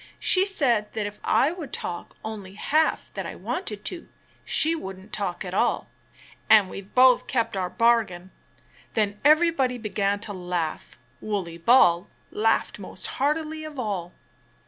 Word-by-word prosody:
She 375 +1 +3
said 240 - +1
that 215 -2 -2
if 205 0 -7
I 285 - +3
would 335 -5 -7
talk 175 -1 -5
only 205 -3 -7
half 310 +9 0
that - - -4
I - - -7
wanted 210 - -5
to, 350 - -5 0.3
she 320 +2 +3
wouldn't 190 - -9
talk 195 -3 -3
at 180 - -6
all, - - 0 0.6
and 210 -4 +6
we've 195 0 -10
both 255 0 +6
kept 230 -5 -1
our 185 -2 -1
bargain." 215 -6 +1 0.6
Then 210 -2 0
everybody 300 -4 +4
began 205 -2 -1
to 205 -1 -2
laugh. 175 -3 -4 0.2
Wooley 185 -6 -3
Ball 175 -4 +4 0.2
laughed 225 +1 +1
most - - -6 0.2
heartily 310 +2 0
of 310 -2 -8
all. 195 -8 -3
215 Hz, 145 wpm, -25 LUFS, 190-270 Hz, 0.6 s, and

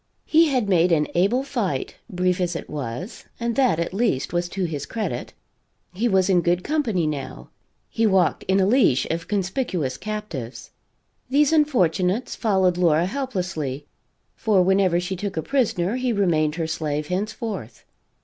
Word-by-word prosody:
He 325 +1 +5
had 255 -7 0
made 180 -2 +3
an 150 -2 +3
able 200 +9 +2
fight, 210 - -3
brief 180 -2 0
as 175 -1 -1
it - - -5
was, 145 - -6
and 235 -1 -1
that 255 -11 +3
at 170 - -2
least 195 - 0
was 175 0 0
to 195 0 -3
his 145 -4 -4
credit. 225 -2 -4 0.6
He 215 +7 0
was 190 -4 +3
in 185 -3 +3
good 175 +1 +1
company, 235 - 0
now; 140 -4 -5 0.4
he 225 0 +1
walked 190 -4 +2
in 190 +1 +3
a 190 - +4
leash 205 - +3
of 165 0 -3
conspicuous 185 - -1
captives. 210 - -6 0.6
These 290 +3 +3
unfortunates 210 - +1
followed 190 -5 +2
Laura 170 -2 +3
helplessly, 180 - -3 0.5
for 210 -5 +2
whenever 190 -2 +3
she 180 +2 -3
took 195 -1 -5
a 160 - -1
prisoner 230 -6 0
he 255 -1 0
remained 165 -7 +1
her 165 -1 -2
slave 150 -2 -3
henceforth. 195 - -4
185 Hz, 160 wpm, -23 LUFS, 165-220 Hz, 0.6 s, He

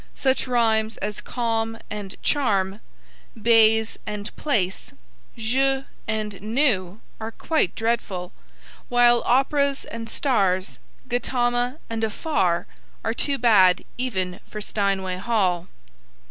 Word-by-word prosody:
Such 265 -1 +1
rhymes 225 -3 +2
as 210 +1 -4
'calm' 225 -2 -2
and 205 -2 -6
'charm,' 200 -8 +1 0.6
'baize' 225 0 +4
and 210 0 -5
'place,' 200 -11 -1 0.4
'jeu' 265 +4 +1 0.2
and 215 -3 -3
'knew,' 215 -5 +1 0.2
are 220 0 -5
quite 310 - 0
dreadful, 225 -6 -2 0.6
while 240 -1 +5
'operas' 280 +2 +2
and 230 -1 -7
'stars,' 195 -9 0 0.3
'Gautama' 245 +1 0
and 225 -1 -3
'afar' 195 - 0 0.4
are 225 - +1
too 280 +3 0
bad 195 -7 +5
even 190 -8 -2
for 210 - -6
Steinway 195 -3 -1
Hall. 185 -5 0
225 Hz, 105 wpm, -24 LUFS, 195-245 Hz, 0.6 s, while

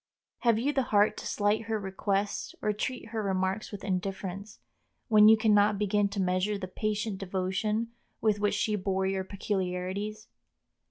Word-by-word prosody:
Have 235 -3 +3
you 275 +6 0
the 270 - +2
heart 205 0 +4
to - - -5
slight 210 +2 +1
her 220 -1 -1
requests 200 +1 -2
or 210 - +2
treat 225 +2 -4
her 225 -1 -2
remarks 190 +1 -1
with 205 -2 -7
indifference, 195 +1 -4 0.5
when 215 -1 +7
you 220 - +7
can 220 -1 +3
not 205 0 +4
begin 205 0 +1
to 200 0 -4
measure 185 +2 +1
the 190 -2 -5
patient 210 +1 -2
devotion 195 +4 -1 0.3
with 215 -2 +2
which 205 0 +1
she 215 - +1
bore 190 -1 -1
your 190 0 0
peculiarities? 195 +2 -3
205 Hz, 165 wpm, -29 LUFS, 190-215 Hz, 0.5 s, when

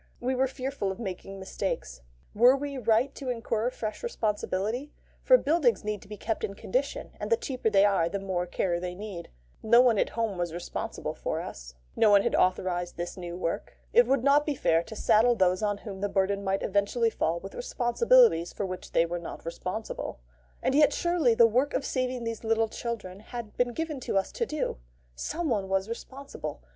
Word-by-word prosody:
We 255 +2 -1
were 260 +1 +2
fearful 260 -6 -3
of 190 - -6
making 195 -2 -6
mistakes. 190 - -4 0.3
Were 245 +5 +6
we 285 0 -4
right 235 +3 +2
to 265 - -6
incur 230 -1 -1
fresh 215 -4 -5
responsibility? 225 - -2 0.3
for - - +7
buildings 290 - +2
need 210 -2 -3
to - - -15
be 210 0 -8
kept 220 +2 -3
in 195 - -3
condition, 260 +9 -2
and - - -4
the 465 - +5
cheaper 255 - -1
they 200 -1 +5
are 190 -5 +2
the 200 - -2
more 185 -2 -2
care 175 -1 -1
they 180 0 -5
need. 195 -3 -7 0.3
No 235 +2 +5
one 240 -4 +5
at - - +2
home 220 -5 -1
was 170 -1 -2
responsible 175 - -4
for - - -3
us. - - -8 0.2
No 215 - +5
one 200 -1 +6
had - - 0
authorised 180 -1 +1
this 175 0 -4
new 175 -1 -6
work. 165 -2 -3 0.2
It 480 +1 +6
would 270 -3 +2
not 280 +2 +5
be 295 -1 -2
fair 165 -8 +2
to 220 - -9
saddle 230 +3 +4
those 185 -2 +2
on 205 -1 0
whom 200 -2 -8
the 205 - 0
burden 200 +1 0
might 195 0 0
eventually 205 +3 +1
fall 165 -3 0
with 195 - -9
responsibilities 470 - +3
for 200 - -3
which 185 -1 -7
they 165 - +4
were 175 +1 -3
not 170 - -8
responsible. 185 - -5 0.4
And - - +2
yet 295 +1 +5
surely 340 -9 +2
the 230 - +7
work 250 +6 +2
of 275 - -1
saving 255 -2 -1
these 230 -1 -4
little 225 0 +2
children 210 -6 -5
had 220 0 -8
been 245 0 +1
given 315 +1 -3
to 220 - -1
us 195 - 0
to 470 - -2
do? 305 - -2 0.4
Someone 230 - -2
was 195 +1 +1
responsible. 270 +4 -7
220 Hz, 200 wpm, -28 LUFS, 190-255 Hz, 0.4 s, for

